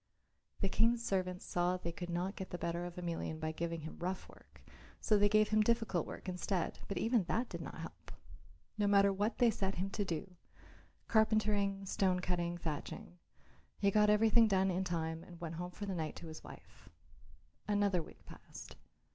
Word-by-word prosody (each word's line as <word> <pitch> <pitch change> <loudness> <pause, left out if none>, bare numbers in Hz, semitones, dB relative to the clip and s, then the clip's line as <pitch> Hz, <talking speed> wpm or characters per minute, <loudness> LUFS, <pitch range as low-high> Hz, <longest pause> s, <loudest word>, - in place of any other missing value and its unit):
The 195 - +2
King's 230 +4 +2
servants 185 -3 -1
saw 175 +1 +1
that 185 - -5
they 170 - -2
could 175 +1 -6
not 180 +3 -1
get 190 - -6
the 175 - -4
better 170 0 -2
of 175 -1 -7
Emelian 170 -2 -3
by 155 0 -2
giving 165 0 -3
him 160 - -8
rough 180 +2 -3
work 70 -1 -18 0.4
so 215 - +3
they 205 0 +5
gave 215 0 +4
him 215 0 +4
difficult 220 -6 +1
work - - -8
instead, 180 0 -1
but 200 - -3
even 225 -4 +2
that 235 +7 0
did - - -5
not - - -7
help. - - -9 0.7
No 205 - +3
matter 200 0 +5
what 205 +4 0
they 240 -2 +5
set 195 -2 -1
him 190 +2 -2
to 205 - -1
do 180 0 -4 0.7
carpentering, 210 -3 +2
stone 185 -1 +2
cutting, 175 -1 -1
thatching 175 +4 -5 0.6
he 200 0 +3
got 210 +1 +5
everything 220 +2 +6
done 190 -2 +3
in 185 +1 0
time 165 -2 -2
and 175 -2 -12
went 170 -2 -5
home 175 +2 -4
for 205 +3 -6
the 195 - -2
night 160 -4 -3
to 170 - -8
his 155 - -9
wife. - - -14 0.8
Another 205 -3 +2
week - - -14
passed. - - -11
185 Hz, 190 wpm, -35 LUFS, 175-205 Hz, 0.8 s, everything